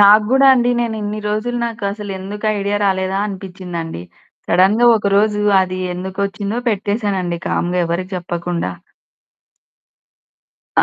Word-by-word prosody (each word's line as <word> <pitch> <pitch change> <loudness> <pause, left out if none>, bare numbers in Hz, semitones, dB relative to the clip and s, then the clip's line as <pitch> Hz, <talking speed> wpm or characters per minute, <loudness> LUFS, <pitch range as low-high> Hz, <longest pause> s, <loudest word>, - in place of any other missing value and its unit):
నాకు 205 +1 +8
గూడా 270 +2 +5
అండి. 245 -1 +2
నేనిన్ని 215 -3 -2
రోజులు, 215 +4 -1
నాకసలెందుకు 205 -2 -4
ఐడియా 200 +1 0
రాలేదా? 190 0 0
అనిపించిందండి. 180 - -6 0.4
సడెన్‌గా, 205 +6 +4
ఒక 200 -2 -1
రోజు 210 0 +2 0.2
అది 185 0 -4
ఎందుకొచ్చిందో 200 +4 -3
పెట్టేసానండి, 200 -4 -1
కామ్‌గా 180 +1 0
ఎవరికీ 185 +3 -3
చెప్పకుండా. 175 - -3 2.1
ఆ! - - +5
200 Hz, 105 wpm, -18 LUFS, 185-210 Hz, 2.1 s, నాకు